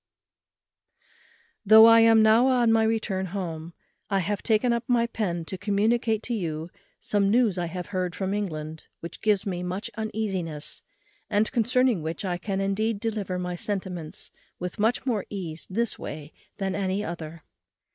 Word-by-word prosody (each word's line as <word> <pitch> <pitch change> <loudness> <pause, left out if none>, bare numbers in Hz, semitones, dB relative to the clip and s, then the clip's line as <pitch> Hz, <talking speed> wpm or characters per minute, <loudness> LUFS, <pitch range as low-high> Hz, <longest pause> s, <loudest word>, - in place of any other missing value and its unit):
_ - - -40 0.6
"Though 220 +1 +9
I 230 0 +8
am 225 -1 +6
now 220 +4 +5
on 245 -3 +3
my 225 0 +4
return 215 -4 -1
home, 170 -3 -5 0.3
I 195 - +1
have 200 +2 -1
taken 230 +2 +2
up 235 0 -1
my 240 -2 +3
pen 180 -8 -3
to 190 +2 -6
communicate 220 +2 +1
to 245 - -3
you 165 -5 -3 0.3
some 200 -1 +1
news 220 -4 +3
I 175 - -1
have 180 +1 -6
heard 185 -2 -2
from 190 0 -2
England, 160 -6 -4
which 170 - -8
gives 210 -3 +2
me 180 -3 -3
much 180 +3 -4
uneasiness, 195 -8 -3 0.5
and 210 0 +1
concerning 250 - +2
which 160 +5 -4
I 175 -2 -2
can 195 +1 -3
indeed 200 +2 0
deliver 205 -5 -2
my 180 0 -3
sentiments 180 -4 -4 0.3
with 180 +2 -6
much 225 +5 +1
more 230 -6 -1
ease 170 -6 -5
this 230 +4 -1
way 150 0 -7 0.2
than 190 -1 -2
any 195 +1 -1
other. 165 -1 -7
200 Hz, 165 wpm, -26 LUFS, 180-220 Hz, 0.6 s, Though